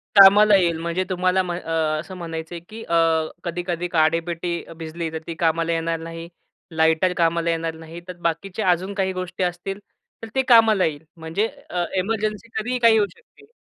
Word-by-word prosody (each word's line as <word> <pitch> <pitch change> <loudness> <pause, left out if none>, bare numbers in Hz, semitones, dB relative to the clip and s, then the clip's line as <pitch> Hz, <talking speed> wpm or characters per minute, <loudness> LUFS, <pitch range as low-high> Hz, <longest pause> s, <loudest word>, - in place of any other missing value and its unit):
कामाला 205 +1 +8
येईल 170 -4 +2
म्हणजे 170 +3 -1
तुम्हाला 185 0 +1
अ, 175 -1 -4 0.3
असं 185 +4 -8
म्हणायचंय 165 0 -6
की 225 +1 -8
अ, 170 - -1 0.5
कधी-कधी 175 0 -3
काडेपेटी 170 +1 0
भिजली 165 0 -5
तर 160 - -4
ती 165 - -3
कामाला 165 0 +1
येणार 165 0 -1
नाही, 165 0 -7 0.4
लाइटर 160 +3 +2
कामाला 170 0 +1
येणार 165 0 -1
नाही. 160 +1 -10
तर 180 -1 -8
बाकीचे 180 +5 -4
अजून 185 +2 +1
काही 190 -1 -1
गोष्टी 185 0 -4
असतील, 180 +2 -3 0.4
तर 225 - -5
ते 265 - +4
कामाला 225 -5 +6
येईल. 150 -1 -3
म्हणजे 165 +7 -1 0.2
अ, 175 -1 -1
एमर्जन्सी 215 +1 -2
कधीही 245 +3 -1
काही 230 -2 +6
होऊ 205 -1 +3
शकते. 445 -2 -23
175 Hz, 165 wpm, -22 LUFS, 165-195 Hz, 0.5 s, कामाला